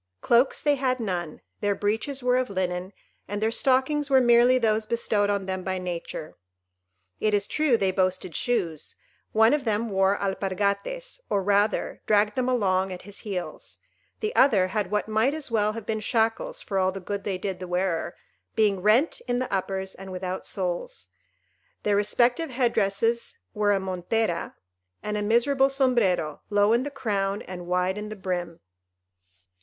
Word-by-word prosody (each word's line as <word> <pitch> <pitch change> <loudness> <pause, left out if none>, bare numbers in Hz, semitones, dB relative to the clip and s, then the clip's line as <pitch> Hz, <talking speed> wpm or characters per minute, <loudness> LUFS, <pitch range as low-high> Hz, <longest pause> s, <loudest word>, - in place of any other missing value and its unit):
Cloaks 240 - +3
they 290 -2 +2
had 255 -1 0
none; 175 -8 -3 0.2
their 205 -1 0
breeches 225 +7 -2
were 250 0 +3
of 255 -2 0
linen, 185 -1 -2 0.4
and 205 0 -3
their 220 +1 +1
stockings 270 +4 +2
were 265 -1 +6
merely 240 +1 +5
those 220 -2 +1
bestowed 215 -3 +1
on 200 -1 0
them 185 -1 -3
by 190 0 -2
Nature. 175 -3 -5 0.9
It 215 -1 +2
is 200 -1 +1
true 300 -3 +2
they 195 -3 +1
boasted 185 -3 -1
shoes; 170 -11 -1 0.4
one 220 +3 +5
of 295 -2 +1
them 220 -1 -1
wore 195 +1 +3
alpargates, 200 - -2
or 200 -2 +1
rather 205 +2 +1
dragged 210 0 +3
them 255 +1 0
along 190 -6 +1
at 180 - -7
his 205 +1 -9
heels; 190 -5 -6 0.4
the 435 +2 -2
other 200 -9 +4
had 205 -2 -1
what 210 +1 -1
might 220 +7 +2
as 305 -5 -4
well 215 -1 +2
have 225 -2 -7
been 220 0 -1
shackles 225 +1 0
for 195 -2 -1
all 185 0 +2
the 195 - -6
good 200 +2 -4
they 195 -2 -2
did 185 -1 -4
the 185 - -6
wearer, 180 -1 -1 0.4
being 205 -4 +2
rent 225 - +3
in 245 0 +1
the 255 -3 -3
uppers, 190 0 -2
and 190 0 -10
without 185 0 -4
soles. 175 - -4 0.7
Their 205 -1 +2
respective 240 +9 +2
head 245 -2 +1
dresses 225 +3 0 0.2
were 210 -1 +2
a 200 - +2
montera 185 0 -2 0.5
and 210 0 -2
a 210 - -1
miserable 265 +6 +3
sombrero, 235 - +1
low 205 +1 +3
in 235 - +3
the 285 - -3
crown 205 -7 -2
and 180 -1 -8
wide 180 +2 0
in 210 0 -6
the 215 - -6
brim. 180 -4 -4
205 Hz, 170 wpm, -26 LUFS, 190-235 Hz, 0.9 s, were